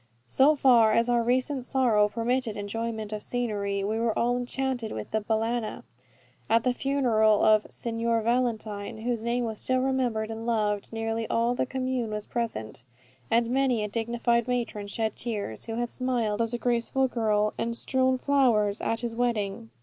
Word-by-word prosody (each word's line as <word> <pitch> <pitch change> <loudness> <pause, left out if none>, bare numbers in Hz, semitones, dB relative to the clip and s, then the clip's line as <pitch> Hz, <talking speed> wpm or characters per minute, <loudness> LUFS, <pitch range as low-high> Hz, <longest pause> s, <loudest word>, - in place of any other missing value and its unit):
So 280 - +4
far 235 -6 +5
as 230 +2 +2
our 240 -1 +3
recent 255 +3 0
sorrow 240 -6 +2
permitted 230 0 -1
enjoyment 220 +1 -4
of 210 - -4
scenery, 205 -5 -2
we 215 +3 -1
were 230 -1 0
all 240 +1 +2
enchanted 245 -1 -2
with 110 - -6
the 220 - 0
Balagna. 225 +1 -2 0.7
At 230 0 +4
the 250 - +2
funeral 235 -6 +2
of 215 -1 +4
"Signor 230 -1 -1
Valentine," 220 -3 -1
whose 240 -2 -1
name 240 +1 -1
was 220 -2 -4
still 255 - 0
remembered 250 -4 0
and 225 +1 -6
loved, 210 -3 0
nearly 225 0 -2
all 235 +1 +1
the 250 - -1
commune 255 -3 -2
was 210 -1 -4
present; 125 - -4 0.5
and 235 0 +2
many 255 -4 +2
a - - -1
dignified 235 +2 0
matron 235 -5 -2
shed 220 +2 -2
tears, 205 - -4
who 225 - -4
had 240 0 -2
smiled 235 -5 -1
as 230 +1 0
a - - -1
graceful 245 +2 +1
girl, 215 -3 +1
and 235 0 -1
strown 260 +1 +1
flowers, 240 -8 +2
at 225 - -1
his 235 -1 -3
wedding. 210 - -1
230 Hz, 170 wpm, -27 LUFS, 215-245 Hz, 0.7 s, far